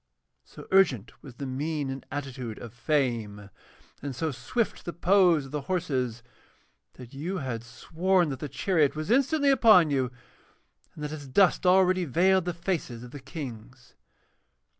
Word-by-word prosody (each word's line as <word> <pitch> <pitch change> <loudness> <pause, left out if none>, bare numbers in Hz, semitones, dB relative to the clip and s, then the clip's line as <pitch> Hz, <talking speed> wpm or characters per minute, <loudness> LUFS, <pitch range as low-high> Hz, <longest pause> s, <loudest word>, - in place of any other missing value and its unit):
So - - -13
urgent 155 - +2
was 130 -5 -12
the 140 - -6
mien 140 +1 -3
and 135 0 -7
attitude 130 -5 -5
of 115 -2 -10
Fame, 120 -7 -1 0.5
and 140 -2 -5
so 155 +5 -2
swift 135 - -2
the 175 - -5
pose 175 -4 +3
of 135 - -12
the 150 -1 -3
horses, 130 -10 -1 0.7
that 125 0 -13
you 170 +8 -4
had 125 -6 -4
sworn 170 +8 0
that 135 -3 -5
the 150 - -5
chariot 160 -8 +1
was 155 +6 -3
instantly 280 +3 +3
upon 215 - +6
you, 130 -3 0 0.8
and 150 - -8
that 150 - -4
its 145 -3 -7
dust 185 +6 +3
already 185 0 +4
veiled 185 +5 +3
the 175 - -1
faces 165 -9 -3
of 125 - -11
the 145 - -8
Kings. 130 -4 -9
145 Hz, 160 wpm, -27 LUFS, 125-180 Hz, 0.8 s, upon